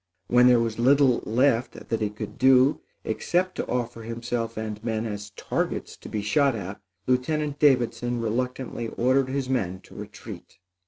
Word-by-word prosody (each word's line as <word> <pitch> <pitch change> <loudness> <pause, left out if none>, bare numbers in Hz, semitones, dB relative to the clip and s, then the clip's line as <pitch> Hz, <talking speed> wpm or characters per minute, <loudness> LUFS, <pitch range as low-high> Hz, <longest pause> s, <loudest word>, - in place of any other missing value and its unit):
When 125 +1 +6
there 125 -1 +6
was 115 -1 -2
little 135 0 +4
left 120 +1 +2
that 115 - -4
he 105 - +1
could 105 0 -8
do 130 +2 +5 0.2
except 185 +1 0
to - - -2
offer 120 -2 -2
himself 115 0 -4
and 110 -1 -5
men 110 -1 -1
as 105 -1 -5
targets - - -3
to - - -11
be 105 -1 -3
shot 140 +4 +2
at, 100 -1 -6 0.2
Lieutenant 145 +3 0
Davidson 120 -4 +2
reluctantly 120 +1 -2
ordered 130 +3 +1
his 135 -1 -2
men 95 -8 -1
to - - -17
retreat. - - -10
120 Hz, 160 wpm, -25 LUFS, 110-130 Hz, 0.2 s, When